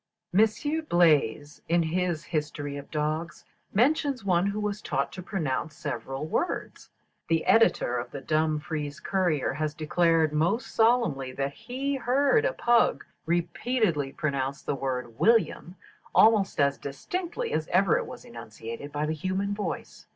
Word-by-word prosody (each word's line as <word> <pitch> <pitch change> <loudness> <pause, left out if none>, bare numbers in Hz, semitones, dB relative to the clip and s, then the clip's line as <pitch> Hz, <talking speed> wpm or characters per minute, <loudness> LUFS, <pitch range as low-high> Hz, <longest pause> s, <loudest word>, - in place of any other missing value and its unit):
Monsieur 220 - +2
Blaze, 150 - +2
in 170 0 +3
his 170 -1 -1
"History 150 -3 -3
of 140 0 -8
Dogs," 155 +1 -3 0.3
mentions 275 0 +1
one 180 0 +2
who 200 +1 -2
was 210 0 -2
taught - - -1
to 185 - -7
pronounce 160 -5 -3
several 135 +1 -4
words. 345 - -3 0.4
The 165 -1 +1
editor 225 - +3
of 120 0 -6
the 140 - -6
"Dumfries 155 0 -1
Courier" 175 -6 0
has 150 +1 -2
declared 160 0 +2
most 175 +10 0
solemnly 220 - +2
that 140 +1 -2
he 270 - -3
"heard 280 - +2
a - - +1
pug 240 - +2 0.2
repeatedly 170 - 0
pronounce 140 -2 -2
the - - -1
word 125 -4 -4
'William,' 225 -5 +2 0.4
almost 215 -6 +5
as 140 -1 +2
distinctly 365 - -4
as - - -1
ever - - +3
it 480 - -5
was 440 - -10
enunciated 115 - -8
by 150 +1 -1
the 155 - -1
human 190 +5 -2
voice. 200 -5 -5
165 Hz, 145 wpm, -27 LUFS, 145-220 Hz, 0.4 s, almost